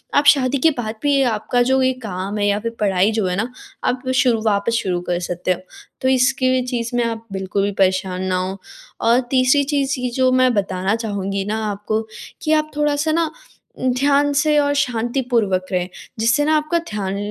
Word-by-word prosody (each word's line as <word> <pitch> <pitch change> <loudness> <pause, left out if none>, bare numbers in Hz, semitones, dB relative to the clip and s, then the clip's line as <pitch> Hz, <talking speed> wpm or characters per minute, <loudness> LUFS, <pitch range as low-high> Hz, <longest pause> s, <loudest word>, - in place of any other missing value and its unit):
आप 285 - +4
शादी 265 0 0
के - - +5
बाद 220 -2 -3
भी 290 -1 +3
ये 275 - +3
आपका 230 +3 0
जो 265 0 +3
ये 260 0 +2
काम 190 +2 -4
है 205 - +1
या 205 0 +1
फिर 230 +2 -3
पढ़ाई 195 0 +2
जो 215 -2 0
है 180 - -1
ना, 230 +5 -2 0.3
आप 250 +1 -1
शुरू 245 -4 +3
वापस 210 +2 +1
शुरू 180 -2 -1
कर 175 0 0
सकते 180 +1 -2
हो, - - -9 0.4
तो 260 - 0
इसके 255 0 +2
भी 255 0 +2
चीज़ 240 -1 -3
में 240 - +2
आप 230 -1 -3
बिल्कुल 190 +1 -1
भी 200 - 0
परेशान 185 -1 +1
ना 185 -1 0
हों। 185 +1 -2 0.5
और 235 +2 +5
तीसरी 265 +2 +4
चीज़ 275 -2 -1
इ 250 - -1
जो 260 -1 +3
मैं 255 -1 +3
बताना 195 -1 0
चाहूँगी 200 -3 -3
ना 215 +2 -2
आपको 210 +2 -2 0.4
कि 310 - -1
आप 305 0 +1
थोड़ा-सा 295 +1 +1
ना 335 +1 +2 0.6
अ, - - -9 0.2
ध्यान 285 +1 +3
से 300 +1 +2
और 285 0 +2
शांतिपूर्वक 235 -6 0
रहें, 180 -1 -1 0.3
जिससे 235 +6 +2
ना 310 +1 +3
आपका 305 +3 0
ध्यान 200 -2 -3
230 Hz, 205 wpm, -20 LUFS, 195-265 Hz, 0.6 s, के